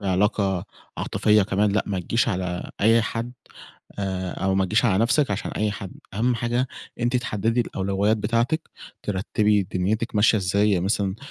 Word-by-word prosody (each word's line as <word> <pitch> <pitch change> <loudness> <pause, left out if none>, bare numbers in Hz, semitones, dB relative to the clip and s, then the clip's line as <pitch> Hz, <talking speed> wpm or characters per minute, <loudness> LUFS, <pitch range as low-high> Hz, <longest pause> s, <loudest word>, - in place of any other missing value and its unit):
في 100 - -5
علاقة 95 -1 +1 0.3
عاطفيّة 105 -1 +3
كمان، 100 +1 +1
لأ 105 - +1
ما 95 -2 -2
تجيش 115 +6 +1
على 90 -1 -3
أي 115 +2 +5
حد 115 +2 -3 0.7
آآ 95 -2 -2
أو 95 0 +2
ما 95 - +2
تجيش 110 +6 +2
على 95 -5 +3
نفسِك 135 0 +2
عشان 100 - -3
أي 105 0 0
حد. 100 -2 -7 0.2
أهَم 120 +4 +1
حاجة 120 +2 0 0.3
أنتِ 120 +1 0
تحدّدي 115 0 0
الأولويّات 100 +2 0
بتاعتِك، 115 +9 0 0.3
ترتّبي 105 +1 +1
دنيتِك 105 +6 -2
ماشية 105 +1 +4
إزاي، 100 +2 +2
يعني 90 -2 +1
مثلًا 100 -1 0
105 Hz, 165 wpm, -24 LUFS, 95-115 Hz, 0.7 s, أي